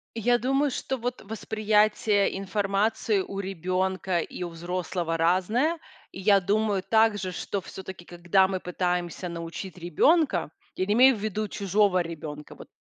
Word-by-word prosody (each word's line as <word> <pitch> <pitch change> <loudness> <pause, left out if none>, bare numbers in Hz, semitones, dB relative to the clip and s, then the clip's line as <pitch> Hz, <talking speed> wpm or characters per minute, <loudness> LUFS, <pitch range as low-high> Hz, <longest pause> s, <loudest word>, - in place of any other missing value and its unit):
Я 240 +2 +3
думаю, 270 +3 +1
что 265 +1 -3
вот 245 +2 -4
восприятие 215 -1 +1
информации 200 +2 0
у 195 +1 -6
ребёнка 185 0 -1
и 175 - -5
у 175 - -3
взрослого 175 0 -3
разное. 210 - +1 0.3
И 190 - -8
я 200 0 +5
думаю 205 0 +1
также, 210 -4 +2
что 200 +3 -3
всё-таки, 190 -1 -9
когда 175 +2 +2
мы 190 -1 -3
пытаемся 180 0 -2
научить 170 +2 -7
ребёнка- 180 - +2 0.3
я 185 - -1
не 205 - +1
имею 255 +2 +6
ввиду 215 0 -3
чужого 200 -2 +2
ребёнка, 150 -3 -8
вот, - - -13
195 Hz, 140 wpm, -26 LUFS, 180-215 Hz, 0.3 s, имею